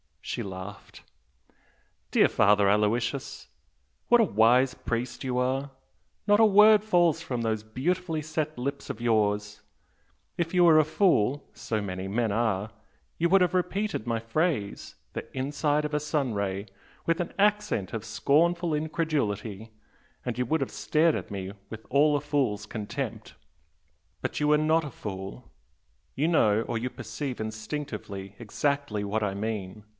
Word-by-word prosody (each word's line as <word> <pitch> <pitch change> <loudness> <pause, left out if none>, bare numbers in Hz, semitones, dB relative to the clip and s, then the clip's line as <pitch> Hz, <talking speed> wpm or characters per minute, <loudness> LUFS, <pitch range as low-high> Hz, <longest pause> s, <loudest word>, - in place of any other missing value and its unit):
She - - -3
laughed. 95 +1 -9 1.1
"Dear - - +5
Father 100 -1 +4
Aloysius, 115 +6 0 0.6
what 240 -1 +6
a - - +6
wise 125 - +4
priest 120 +2 -4
you 125 -1 -2
are! 135 +2 0 0.5
Not 205 0 +4
a 225 - +7
word 210 0 +7
falls 175 -6 +3
from 130 -7 -3
those 110 -2 -1
beautifully 160 +8 -2
set 155 0 -3
lips 140 +3 -4
of 115 - -5
yours! 105 -2 0 0.8
If 170 0 -2
you 180 -1 +5
were 160 -2 +7
a 155 - +4
fool 145 - +2
(so 110 -2 -3
many 95 -1 -4
men 110 +2 0
are!) 110 -1 0 0.5
you 170 +1 +1
would 195 +1 +5
have 180 0 +2
repeated 185 - -1
my 115 -1 0
phrase, 115 - -2 0.2
'the - - -7
inside 145 +3 0
of 150 - -4
a 150 - +2
sun 145 -4 -1
ray,' 100 0 -2 0.4
with 165 +1 +1
an 175 - -3
accent 210 - +1
of 110 -1 -5
scornful 170 +7 +2
incredulity, 120 - -2 0.5
and 120 -2 -3
you 125 - 0
would 160 +5 0
have 135 - -2
stared 160 +1 +2
at - - -4
me 95 -1 -5 0.2
with 110 0 -9
all 145 +3 +4
a 145 - 0
fool's 135 -8 -1
contempt! 105 -2 -5 0.9
But - - -3
you 150 0 +2
are - - +5
not 155 +1 +2
a 145 - -6
fool, 95 +2 -7 0.6
you 150 +4 +1
know 110 -11 +3
or 115 - -3
you 125 +3 -2
perceive 120 +3 -6
instinctively 110 -4 -6
exactly 125 -1 -1
what 105 +2 -1
I 100 -2 -1
mean. 105 -1 -4
125 Hz, 155 wpm, -27 LUFS, 105-155 Hz, 1.1 s, a